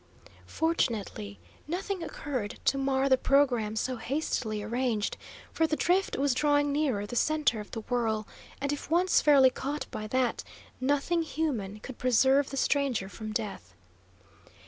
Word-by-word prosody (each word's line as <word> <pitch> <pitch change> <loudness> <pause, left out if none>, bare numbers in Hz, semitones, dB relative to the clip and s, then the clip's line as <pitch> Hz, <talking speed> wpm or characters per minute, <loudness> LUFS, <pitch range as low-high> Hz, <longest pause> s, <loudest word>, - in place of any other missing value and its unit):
Fortunately 220 - -1 0.3
nothing 370 +3 -3
occurred 255 -9 -4
to 275 - +2
mar 270 0 +1
the 260 -1 +4
programme 250 -7 +2
so 255 +3 -1
hastily 225 -4 -2
arranged, 230 -1 -1 0.4
for 320 - +2
the 310 - 0
drift 365 +5 +1
was 275 -1 +2
drawing 290 +1 +2
nearer 275 -9 0
the 225 - -7
centre 300 -3 +2
of 210 - -8
the 225 - -5
whirl, 220 -3 -1 0.3
and 280 +1 -1
if 290 - -6
once 350 +3 +3
fairly 275 -3 +6
caught 285 +4 -4
by 215 - -5
that, 255 +2 0 0.4
nothing 290 +6 +1
human 250 -11 -2
could 260 0 -9
preserve 265 +3 +3
the 275 - -5
stranger 270 -9 +1
from 215 +1 -7
death. 195 - -5
265 Hz, 145 wpm, -29 LUFS, 220-290 Hz, 0.4 s, fairly